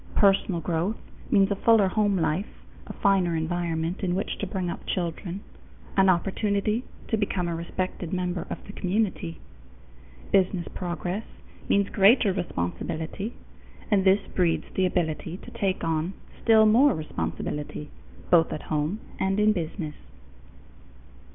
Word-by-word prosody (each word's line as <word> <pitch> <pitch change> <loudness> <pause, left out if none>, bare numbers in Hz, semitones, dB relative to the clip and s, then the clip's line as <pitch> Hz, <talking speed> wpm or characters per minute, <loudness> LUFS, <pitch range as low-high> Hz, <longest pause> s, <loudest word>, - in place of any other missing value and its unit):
Personal 195 -3 +3
growth 175 +6 -1 0.3
means 200 -1 +4
a - - +2
fuller 220 0 +5
home 205 0 +2
life, 160 +4 0 0.4
a - - -6
finer 190 -4 +3
environment 165 +1 -1
in 180 -1 +1
which 195 - -2
to 200 - -2
bring 185 -1 -2
up 170 - -6
children, 175 +2 -3 0.5
an 190 -1 +5
opportunity 200 +5 +1 0.3
to 220 - +2
become 195 -4 -1
a 170 - -2
respected 175 +1 -4
member 180 -2 -2
of - - -3
the 200 - -9
community. 185 -4 -1 0.9
Business 185 -2 +2
progress 180 +3 -3 0.5
means 200 0 +3
greater 200 +1 +5
responsibility, 160 - -3 0.6
and 200 -2 +4
this 195 +1 +4
breeds 175 -3 +1
the 185 -1 +2
ability 165 -1 -2
to - - -12
take 195 -2 -1
on 165 +2 0 0.3
still 220 -1 +6
more 235 +4 +5
responsibility, 150 -1 -4 0.4
both 165 -2 +5
at 155 - -4
home 155 +7 0 0.2
and 195 +1 +1
in 215 0 +5
business. 165 -3 -4
185 Hz, 135 wpm, -26 LUFS, 170-200 Hz, 0.9 s, still